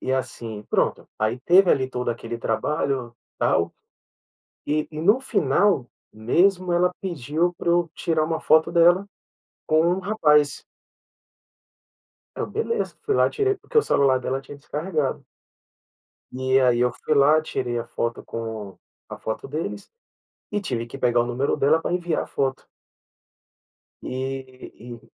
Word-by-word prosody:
E 130 Hz, -, -2 dB
assim 120 Hz, -5 st, -4 dB
pronto, -, -, 0 dB
aí 110 Hz, +3 st, -1 dB
teve 180 Hz, +4 st, +5 dB
ali 130 Hz, -1 st, +2 dB
todo 125 Hz, -2 st, -2 dB
aquele 115 Hz, 0 st, -5 dB
trabalho 120 Hz, +1 st, -2 dB, 0.2 s
tal, -, -, +1 dB, 0.9 s
e 150 Hz, +1 st, 0 dB
e 155 Hz, -, -6 dB
no 205 Hz, +9 st, +4 dB
final 195 Hz, -, +2 dB, 0.2 s
mesmo, 180 Hz, -, +2 dB
ela 180 Hz, +1 st, +3 dB
pediu 170 Hz, 0 st, -1 dB
pra -, -, -4 dB
eu 170 Hz, -1 st, +2 dB
tirar 160 Hz, -2 st, 0 dB
uma 160 Hz, 0 st, -1 dB
foto 160 Hz, +1 st, +4 dB
dela 175 Hz, +3 st, +4 dB, 0.6 s
com 155 Hz, 0 st, +3 dB
um 180 Hz, +2 st, 0 dB
rapaz. 150 Hz, -9 st, +2 dB, 1.7 s
Aí -, -, -3 dB
eu: -, -, -3 dB
"Beleza." 455 Hz, +2 st, -2 dB
Fui 420 Hz, -, 0 dB
lá, -, -, +4 dB
tirei 405 Hz, -2 st, 0 dB
porque 460 Hz, +4 st, -4 dB
o -, -, +8 dB
celular 135 Hz, -, +3 dB
dela 130 Hz, +1 st, -2 dB
tinha 145 Hz, +1 st, -11 dB
descarregado. 150 Hz, 0 st, -3 dB, 1.1 s
E 130 Hz, +1 st, +2 dB
aí, 125 Hz, -2 st, +3 dB
eu 125 Hz, 0 st, +2 dB
fui -, -, +2 dB
lá, 145 Hz, +3 st, +5 dB
tirei 125 Hz, -6 st, -3 dB
a 115 Hz, -, -3 dB
foto 115 Hz, 0 st, -3 dB
com 110 Hz, -4 st, -6 dB, 0.3 s
a -, -, -8 dB
foto 110 Hz, -, -5 dB
deles 160 Hz, +7 st, -5 dB, 0.6 s
e 205 Hz, -, -1 dB
tive 120 Hz, -, -3 dB
que -, -, -9 dB
pegar 120 Hz, -1 st, +2 dB
o 120 Hz, -, 0 dB
número 125 Hz, +3 st, 0 dB
dela 155 Hz, +4 st, +3 dB
pra -, -, -2 dB
enviar 175 Hz, -2 st, -1 dB
a -, -, -7 dB
foto. 135 Hz, -1 st, -2 dB, 1.4 s
E 130 Hz, 0 st, -6 dB
e 120 Hz, 0 st, -10 dB
145 Hz, 150 wpm, -24 LUFS, 125-175 Hz, 1.7 s, o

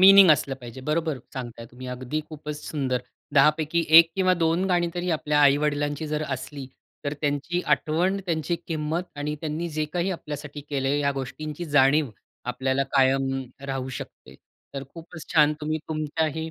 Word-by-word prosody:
Meaning 195 Hz, -1 st, +9 dB
असलं 140 Hz, -2 st, +3 dB
पाहिजे, 125 Hz, -1 st, -10 dB
बरोबर 155 Hz, +1 st, -1 dB, 0.2 s
सांगताय 120 Hz, -3 st, -6 dB
तुम्ही, 130 Hz, +1 st, -10 dB
अगदी 125 Hz, +4 st, -3 dB
खूपच 150 Hz, -1 st, -7 dB
सुंदर. 130 Hz, -4 st, -1 dB, 0.3 s
10पैकी 155 Hz, +3 st, +4 dB
1 165 Hz, 0 st, +7 dB
किंवा 185 Hz, -1 st, +4 dB
2 165 Hz, +1 st, +1 dB
गाणी 175 Hz, -2 st, +2 dB
तरी 180 Hz, 0 st, -2 dB
आपल्या 150 Hz, -2 st, +1 dB
आई-वडिलांची 145 Hz, +1 st, +2 dB
जर 150 Hz, 0 st, -1 dB
असली, 135 Hz, +1 st, -5 dB, 0.4 s
तर 145 Hz, -, -1 dB
त्यांची 145 Hz, +4 st, 0 dB
आठवण, 170 Hz, +7 st, 0 dB
त्यांची 165 Hz, 0 st, 0 dB
किंमत 160 Hz, +1 st, -1 dB, 0.2 s
आणि 150 Hz, +1 st, -2 dB
त्यांनी 160 Hz, +2 st, -3 dB
जे 155 Hz, 0 st, -1 dB
काही 180 Hz, +2 st, 0 dB
आपल्यासाठी 150 Hz, -4 st, -6 dB
केलंय, 140 Hz, 0 st, +1 dB
ह्या 140 Hz, -1 st, +1 dB
गोष्टींची 150 Hz, +5 st, -5 dB
जाणीव 145 Hz, -2 st, +4 dB, 0.4 s
आपल्याला 130 Hz, +2 st, 0 dB
कायम 135 Hz, 0 st, +3 dB, 0.4 s
राहू 135 Hz, -1 st, -3 dB
शकते. -, -, -11 dB, 0.4 s
तर 135 Hz, 0 st, -4 dB
खूपच 165 Hz, -1 st, -10 dB
छान 150 Hz, -2 st, +5 dB
तुम्ही 155 Hz, +1 st, -1 dB
तुमच्याही 160 Hz, +1 st, -2 dB
150 Hz, 155 wpm, -25 LUFS, 135-160 Hz, 0.4 s, Meaning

